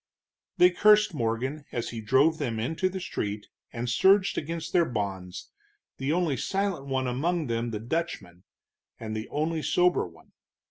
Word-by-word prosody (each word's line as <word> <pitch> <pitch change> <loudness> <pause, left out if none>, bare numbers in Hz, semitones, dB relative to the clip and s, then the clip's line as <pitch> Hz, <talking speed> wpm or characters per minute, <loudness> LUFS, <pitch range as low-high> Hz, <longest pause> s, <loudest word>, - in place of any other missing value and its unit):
They 180 +1 +6
cursed 210 +1 +5
Morgan 130 +3 -2
as 120 - -3
he 115 -2 -5
drove 135 +9 +3
them 115 -2 -2
into 160 +11 0
the 190 +1 -5
street, 105 - -4 0.2
and 120 +1 -4
surged 190 - +4
against 165 +1 -4
their 175 - +5
bonds, 100 - -4 0.5
the 135 +2 -1
only 165 -5 +1
silent 195 -8 -2
one 130 -1 -1
among 155 +7 0
them 115 -1 -2
the 110 -2 -4
Dutchman, 110 - -4 0.6
and 110 -1 -5
the 110 +1 -5
only 155 +2 -1
sober 180 - +2
one. 85 -1 -19
135 Hz, 155 wpm, -27 LUFS, 115-170 Hz, 0.6 s, They